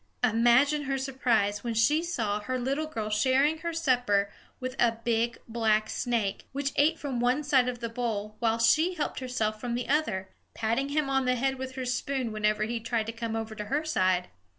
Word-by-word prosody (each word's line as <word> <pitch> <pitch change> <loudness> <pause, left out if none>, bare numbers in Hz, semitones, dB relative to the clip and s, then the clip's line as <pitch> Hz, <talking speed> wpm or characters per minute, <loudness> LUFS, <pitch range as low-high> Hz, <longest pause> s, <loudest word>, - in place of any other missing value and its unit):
Imagine 250 +6 +4
her 270 0 -1
surprise 240 -6 0
when 235 -2 -2
she 290 +8 +3
saw 225 -12 -1
her 255 +5 -3
little 275 +5 -1
girl 220 -8 -4
sharing 270 +8 +3
her 335 +1 -3
supper 245 -11 +1 0.3
with 255 0 -4
a 235 -1 +4
big 235 0 0
black 220 -2 +1
snake, 225 -5 -1
which 280 0 -1
ate 310 +3 +3
from 275 -5 -3
one 250 +5 +2
side 260 -3 +3
of 245 -1 -6
the 230 - -2
bowl 225 -3 -3
while 230 -1 +1
she 315 +10 +3
helped 305 - -2
herself 225 -5 -2
from 240 -1 -2
the 245 - -3
other, 220 -11 0 0.3
patting 235 +5 0
him 295 0 0
on 270 -1 +1
the 250 0 +2
head 265 +1 -1
with 260 0 -5
her 260 -1 -4
spoon 250 0 -2
whenever 215 0 +1
he 230 +2 -2
tried 230 -1 -1
to 225 - -4
come 230 0 -4
over 225 -1 -4
to 210 -1 -6
her 290 +8 -1
side! 185 - +1
245 Hz, 200 wpm, -28 LUFS, 220-270 Hz, 0.3 s, Imagine